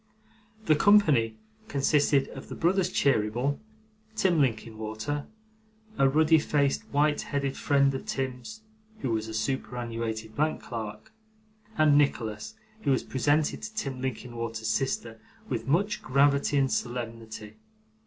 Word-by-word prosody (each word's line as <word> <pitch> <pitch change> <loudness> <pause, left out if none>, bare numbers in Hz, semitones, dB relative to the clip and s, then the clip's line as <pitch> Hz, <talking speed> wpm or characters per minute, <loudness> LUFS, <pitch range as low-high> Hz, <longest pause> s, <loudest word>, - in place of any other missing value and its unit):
The 155 - +5
company 150 - +4 0.3
consisted 140 -2 +2
of 135 - -10
the - - -6
brothers 185 +2 +2
Cheeryble, 125 - +1 0.6
Tim 185 -7 +3
Linkinwater, 110 +2 -2 0.7
a 135 -1 +5
ruddy 155 +3 +5
faced 145 -2 +1
white 150 +1 +1
headed 140 -2 -2
friend 140 -1 +2
of 135 - -5
Tim's 135 - -4 0.4
(who 125 - -1
was 110 -1 -1
a 110 - -6
superannuated 115 -2 -3
bank 155 +1 0
clerk), 110 - -7 0.6
and 150 -2 +5
Nicholas, 110 - -1 0.3
who 145 - -1
was 130 - +2
presented 145 +3 +1
to 215 0 -7
Tim 135 -11 -3
Linkinwater's 115 -3 -4
sister 115 -1 -1 0.3
with 115 -2 -3
much 200 +9 +1
gravity 140 +2 +3
and 135 -1 +2
solemnity. 115 -3 -4
135 Hz, 125 wpm, -28 LUFS, 115-145 Hz, 0.7 s, The